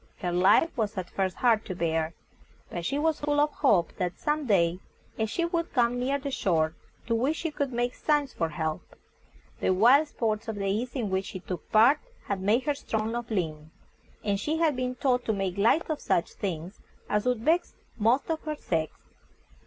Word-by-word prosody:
Her 175 - -2
life 185 - +4
was 215 -3 -2
at 185 -2 -4
first 190 -1 -1
hard 230 -3 +3
to 185 - -5
bear, 165 -1 -1 0.6
but 175 - -4
she 275 +11 -1
was 310 +1 +1
full 290 0 +1
of 300 +1 +3
hope 195 - +2
that 180 -2 -2
some 295 -1 -1
day 175 -4 +3 0.4
a 220 - +1
ship 340 - -2
would 335 -1 -1
come 245 -1 +2
near 270 +3 +1
the 280 0 -5
shore, 160 -9 +1 0.3
to 230 - 0
which 260 +7 +1
she 330 - -2
could 285 -2 -2
make 240 +1 -1
signs 295 -3 0
for 165 - -1
help. 160 -2 -4 0.6
The - - 0
wild 245 +11 +5
sports 225 -4 -2
of 220 - -3
the 200 -1 -3
East 220 +7 -1
in 225 -7 -2
which 190 0 0
she 190 - -6
took 180 -3 -7
part 240 +7 +6 0.3
had 200 -2 -2
made 215 +6 +2
her 290 - +1
strong 220 -5 -2
of 240 0 -4
limb, 160 -7 -2 0.5
and 200 -1 0
she 310 +8 -1
had 320 -3 +2
been 255 0 -2
taught 250 -2 +1
to 220 - +1
make 195 -3 -2
light 225 +11 +3
of 310 -2 -3
such 170 - 0
things 180 0 -5 0.3
as 210 +3 0
would 250 -3 +1
vex 325 +8 +1 0.2
most 235 +5 +2
of 320 - -2
her 305 -1 -3
sex. 160 - -1
225 Hz, 205 wpm, -28 LUFS, 185-280 Hz, 0.6 s, part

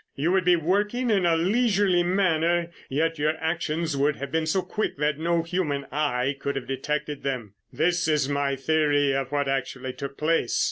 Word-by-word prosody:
You 155 +6 0
would 190 -2 +2
be 180 0 +6
working 205 +9 0
in 195 -4 +3
a 165 -1 +3
leisurely 195 -1 +2
manner, 175 -2 +1 0.2
yet 160 +3 0
your 155 +2 +1
actions 160 -1 -2
would 145 +2 +1
have 140 0 -6
been 160 -1 0
so 185 +4 +1
quick 215 - -3
that 150 0 0
no 170 0 +1
human 165 -5 -2
eye 140 -2 0
could 140 0 -3
have 135 - -4
detected 150 +2 -3
them. 125 -7 -4 0.2
This 170 +1 +1
is 150 -4 +2
my 140 -1 0
theory 145 0 +2
of 135 -1 -2
what 145 -1 0
actually 130 -1 -3
took 140 +2 -7
place. 155 -5 +1
155 Hz, 185 wpm, -25 LUFS, 140-175 Hz, 0.2 s, be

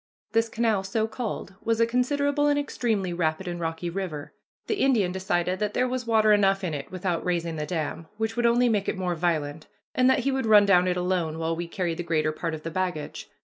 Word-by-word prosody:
This 225 +1 +2
canal, 220 -4 +1
so 215 +3 0
called, 220 -3 -5
was 230 0 0
a 230 - +5
considerable 285 +4 +1
and 290 0 +3
extremely 220 -10 -1
rapid 170 +1 -1
and 175 0 -4
rocky 165 +1 -3
river. 170 -5 -5 0.3
The 430 - -1
Indian 225 -9 +3
decided 185 -1 -1
that 210 -1 -2
there 255 - +2
was 250 -1 -3
water 215 -2 +4
enough 195 -1 +3
in 175 -4 -2
it 140 -2 -6
without 180 -2 -2
raising 170 -2 -1
the 150 -1 -3
dam, 160 0 -3
which 220 0 -2
would 240 -1 +2
only 240 +1 +4
make 210 -4 +1
it - - -2
more 180 -1 -1
violent, 155 -3 -1 0.3
and 255 0 +4
that - - +3
he 275 - 0
would 265 -3 -1
run 210 -2 +7
down 180 -2 +4
it 180 0 0
alone, 180 -3 -1
while 165 0 -1
we 170 +1 -4
carried 170 -2 -2
the - - -1
greater 155 -2 +1
part 165 +1 -3
of 155 - -10
the 165 - -4
baggage. 180 -4 -3
185 Hz, 230 wpm, -26 LUFS, 170-225 Hz, 0.3 s, run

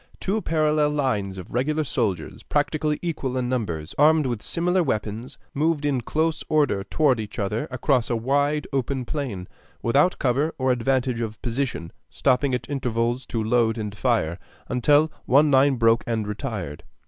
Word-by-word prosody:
Two 210 +3 -1
parallel 155 -3 +2
lines 105 -10 -1
of 90 - -9
regular 150 +6 0
soldiers, 100 - -2
practically 150 0 0
equal 140 -6 -2
in 125 -1 -1
numbers, 95 -12 -3
armed 155 0 +5
with 120 -4 -2
similar 180 +7 +1
weapons, 110 -4 -3 0.2
moved 150 0 0
in 135 -4 +1
close 160 +6 -1
order 145 -10 +2
toward 140 0 +2
each 105 -1 -6
other 105 +1 -2
across 130 -1 +1
a 120 - +1
wide, 140 +5 +1
open 135 -1 -1
plain, 120 - -4 0.4
without 145 +10 +3
cover 140 +4 0
or 130 -1 +1
advantage 125 0 0
of 110 -2 -4
position, 120 - -2 0.2
stopping 130 0 +1
at 125 -2 -5
intervals 125 -2 -1
to 115 -2 -2
load 115 0 +2
and 105 -2 -4
fire, 105 -8 0 0.3
until 145 +5 +3 0.2
one 145 +3 +5
line 135 +1 +5
broke 115 -1 +3
and 110 -3 -1
retired. 105 - -5
130 Hz, 160 wpm, -24 LUFS, 115-145 Hz, 0.4 s, armed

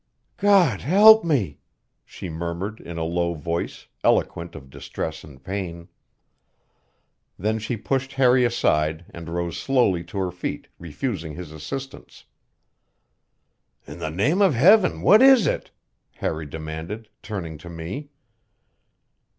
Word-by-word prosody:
"God 200 -3 +4
help 215 +6 +7
me!" 115 - 0 0.4
she - - -9
murmured 85 +6 -5
in 85 -1 -8
a 80 - -2
low 85 +1 -1
voice, 85 +2 -4 0.2
eloquent 85 0 +1
of 65 -4 -11
distress 80 +3 -6
and 70 -3 -15
pain. 90 -2 -5 1.5
Then 110 +3 -1
she 110 +2 -3
pushed 135 +4 -2
Harry 130 -1 +4
aside 80 -8 +1
and 85 -1 -9
rose 85 0 -3
slowly 120 -10 +2
to - - -9
her 95 -2 -1
feet, 90 +1 -5
refusing 85 - -4
his 90 -3 -8
assistance. 135 - -8 1.6
"In 75 +4 -10
the 80 -2 -3
name 135 - +1
of 190 -9 +4
Heaven, 185 - +5
what 210 +4 +7
is 265 -4 +7
it?" - - -1 0.5
Harry 80 -1 -3
demanded, 80 +8 -7
turning 85 -8 -6
to 85 - -11
me. 85 - -7
90 Hz, 125 wpm, -23 LUFS, 80-130 Hz, 1.6 s, help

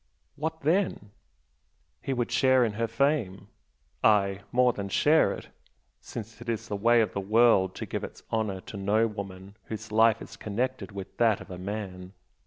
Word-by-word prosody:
what 160 +2 -4
then? 160 - 0 0.9
He - - -3
would 120 -2 -1
share 130 -2 +4
in 110 - -2
her 115 +2 -1
fame, 115 -6 0 0.5
aye, 100 -2 +3
more 125 0 +4
than 100 -2 -5
share 155 +9 +4
it, - - -7 0.5
since 115 0 -9
it 120 - -7
is 115 -2 -2
the 105 - -2
way 115 +3 +4
of 105 -4 -1
the 100 - -2
world 105 -2 +4
to - - -5
give - - -4
its - - -8
honour 105 -4 -1
to 100 - -9
no 105 +3 +2
woman 100 -2 -7
whose 110 0 -7
life 110 +1 +4
is 115 - -10
connected 120 +4 -3
with 100 -1 -8
that 115 -3 +3
of - - -11
a 90 - -7
man. 95 -2 -6
110 Hz, 180 wpm, -28 LUFS, 100-120 Hz, 0.9 s, share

